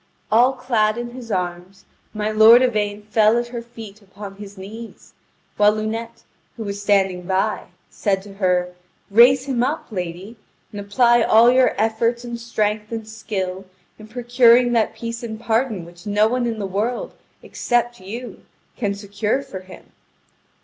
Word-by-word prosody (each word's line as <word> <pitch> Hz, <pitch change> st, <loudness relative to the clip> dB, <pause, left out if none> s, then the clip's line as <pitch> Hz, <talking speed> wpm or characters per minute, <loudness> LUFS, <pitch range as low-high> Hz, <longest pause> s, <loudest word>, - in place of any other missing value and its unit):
All 245 Hz, +4 st, +5 dB
clad 230 Hz, -4 st, 0 dB
in 240 Hz, 0 st, -5 dB
his 240 Hz, -2 st, -9 dB
arms, 180 Hz, +1 st, -4 dB, 0.3 s
my 215 Hz, 0 st, -2 dB
lord 220 Hz, +3 st, +7 dB
Yvain 210 Hz, -4 st, -1 dB
fell 215 Hz, +1 st, +3 dB
at 240 Hz, 0 st, -2 dB
her 240 Hz, -1 st, -5 dB
feet 225 Hz, -3 st, -12 dB
upon 195 Hz, 0 st, -11 dB
his 200 Hz, -1 st, -11 dB
knees, 220 Hz, +4 st, -11 dB, 0.4 s
while 210 Hz, 0 st, +5 dB
Lunete, 225 Hz, +2 st, -5 dB, 0.3 s
who 225 Hz, -, -5 dB
was 200 Hz, -1 st, -5 dB
standing 195 Hz, -3 st, +2 dB
by, 190 Hz, 0 st, 0 dB, 0.3 s
said 195 Hz, -3 st, -1 dB
to 200 Hz, -1 st, -12 dB
her: 180 Hz, -2 st, 0 dB, 0.4 s
"Raise 250 Hz, +5 st, +6 dB
him 260 Hz, -4 st, -1 dB
up, 285 Hz, +6 st, -1 dB
lady, 185 Hz, +3 st, -6 dB, 0.3 s
and 205 Hz, -, -6 dB
apply 240 Hz, +4 st, +3 dB
all 225 Hz, +2 st, +6 dB
your 255 Hz, 0 st, +3 dB
efforts 230 Hz, +2 st, 0 dB
and 235 Hz, -1 st, -6 dB
strength 215 Hz, -2 st, -2 dB
and 225 Hz, -1 st, -5 dB
skill 195 Hz, -4 st, -5 dB, 0.3 s
in 215 Hz, -, -12 dB
procuring 245 Hz, +1 st, +4 dB
that 225 Hz, -2 st, +1 dB
peace 230 Hz, +1 st, -6 dB
and 220 Hz, -2 st, -6 dB
pardon 225 Hz, -5 st, -1 dB
which 175 Hz, +4 st, -14 dB
no 210 Hz, +1 st, +3 dB
one 245 Hz, +1 st, -1 dB
in 230 Hz, -1 st, -3 dB
the 205 Hz, -, -3 dB
world, 210 Hz, +6 st, -3 dB, 0.3 s
except 240 Hz, 0 st, -1 dB
you, 230 Hz, +6 st, -8 dB, 0.4 s
can 205 Hz, -4 st, -1 dB
secure 205 Hz, +5 st, -2 dB
for 190 Hz, -, -8 dB
him." 185 Hz, 0 st, -15 dB
220 Hz, 160 wpm, -21 LUFS, 200-235 Hz, 0.4 s, lord